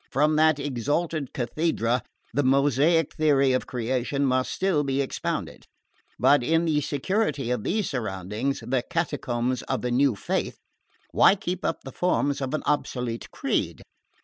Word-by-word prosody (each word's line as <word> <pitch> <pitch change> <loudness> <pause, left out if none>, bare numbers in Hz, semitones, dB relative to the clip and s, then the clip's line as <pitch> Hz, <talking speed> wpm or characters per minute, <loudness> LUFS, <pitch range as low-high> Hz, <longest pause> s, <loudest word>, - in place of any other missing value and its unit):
From 150 +3 +2
that 155 -1 +4
exalted 145 +2 -2
cathedra 125 -2 0 0.3
the 145 - +2
Mosaic 140 +4 +3
theory 140 -4 +3
of 130 - -1
Creation 130 +3 -1
must 130 -1 +1
still 185 -6 +1
be 135 -1 -1
expounded; 140 - -3 0.5
but 135 +3 +4
in 165 +7 +2
the 150 -2 +1
security 145 - -1
of 125 -4 -1
these 210 +2 -1
surroundings 110 +2 -3
the 125 +1 0
catacombs 125 -7 -2
of - - -1
the 125 - -1
new 130 -1 +3
faith - - -2 0.5
why - - +6
keep 185 -1 -4
up - - -2
the 135 - -8
forms 145 -3 0
of 135 +2 -2
an - - -3
obsolete 125 -5 -2
creed? - - -2
140 Hz, 150 wpm, -25 LUFS, 125-155 Hz, 0.5 s, why